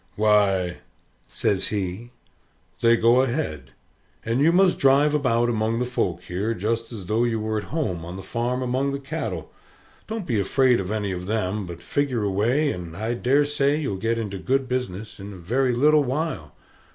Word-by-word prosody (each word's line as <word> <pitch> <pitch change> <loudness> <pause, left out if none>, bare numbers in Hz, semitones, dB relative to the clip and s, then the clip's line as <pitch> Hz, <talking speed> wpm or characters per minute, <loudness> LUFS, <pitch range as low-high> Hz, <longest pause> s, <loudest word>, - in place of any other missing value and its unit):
"Why," 100 -4 +2 0.5
says 95 -2 0
he, 100 +3 -3 0.7
"they 115 0 +5
go 120 +3 +5
ahead. 120 - -2 0.6
And 115 +3 0
you 160 +3 +5
must 185 +1 +3
drive 140 +2 +4
about 120 -5 +2
among 115 -1 0
the 125 - 0
folks 90 -8 -2
here 100 +6 -2
just 115 +3 -2
as 105 -5 -7
though 110 +5 +1
you 115 -2 0
were 110 0 -1
at - - -8
home, 130 - -2
on 85 +2 -7
the 95 - -7
farm 120 +5 -2
among 130 +3 0
the 140 - -3
cattle. 135 - -5 0.6
Don't 220 -3 -4
be 115 -8 0
afraid 125 +5 +3
of 95 -1 -4
any 105 -2 -2
of 90 0 -5
them, 105 -2 -1
but 85 0 -9
figure 135 -6 0
away, 115 +10 +1
and 85 -5 -7
I 110 +3 -2
dare 135 +4 +2
say 145 0 +1
you'll 140 -11 -2
get 115 +4 -1
into 100 -4 -4
good 135 +5 0
business 115 -6 -4
in 100 +1 -8
a - - -10
very 120 +8 0
little 150 +4 +4
while. 135 - -3
115 Hz, 185 wpm, -24 LUFS, 100-135 Hz, 0.7 s, they